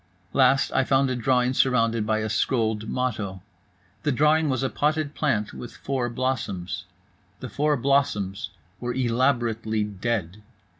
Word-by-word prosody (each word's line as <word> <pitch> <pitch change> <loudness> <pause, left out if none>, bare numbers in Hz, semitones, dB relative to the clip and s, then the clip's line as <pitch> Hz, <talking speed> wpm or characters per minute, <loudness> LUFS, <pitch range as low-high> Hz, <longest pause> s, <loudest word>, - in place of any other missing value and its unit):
Last, 135 +1 +4
I 130 - +2
found 135 0 +2
a - - 0
drawing 125 +1 +2
surrounded 115 -4 +2
by 110 0 +1
a 110 - -1
scrolled 110 -1 0
motto. 105 -7 -2 0.6
The 150 - +1
drawing 150 +3 +3
was 130 0 0
a 135 - +1
potted 150 0 0
plant 120 -11 0
with 120 - -9
four 130 -3 -2
blossoms. 120 -8 -3 0.5
The - - -6
four 150 +1 +1
blossoms 110 -7 0 0.3
were 120 0 -3
elaborately 120 -3 +1
dead. 105 -2 -3
125 Hz, 140 wpm, -25 LUFS, 110-135 Hz, 0.6 s, Last